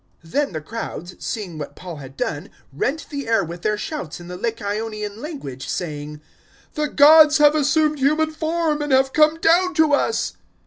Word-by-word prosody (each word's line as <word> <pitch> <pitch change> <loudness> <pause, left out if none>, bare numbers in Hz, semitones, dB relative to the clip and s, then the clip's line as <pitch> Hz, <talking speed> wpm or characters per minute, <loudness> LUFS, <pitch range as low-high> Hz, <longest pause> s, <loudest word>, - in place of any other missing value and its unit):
Then 280 - -1
the 155 -3 -5
crowds, 180 -1 -6
seeing 185 -8 -5
what 145 - -7
Paul 175 -3 -8
had 135 -1 -11
done, 145 - -3 0.2
rent 275 - -2
the 280 -4 -5
air 225 0 +2
with 170 +1 -7
their 210 +2 0
shouts 210 - -5
in 175 0 -11
the 180 - -6
Lycaonian 215 0 -4
language, 255 - -7
saying, 150 -3 -5 0.5
"The 300 -1 -1
gods 300 +1 +7
have 295 -1 +6
assumed 305 0 +2
human 305 +3 +2
form 315 -1 -1
and 295 -1 -2
have 265 0 +3
come 310 +1 +4
down 350 +2 +3
to 315 -2 +3
us." 365 +10 +1
265 Hz, 175 wpm, -21 LUFS, -, 0.5 s, gods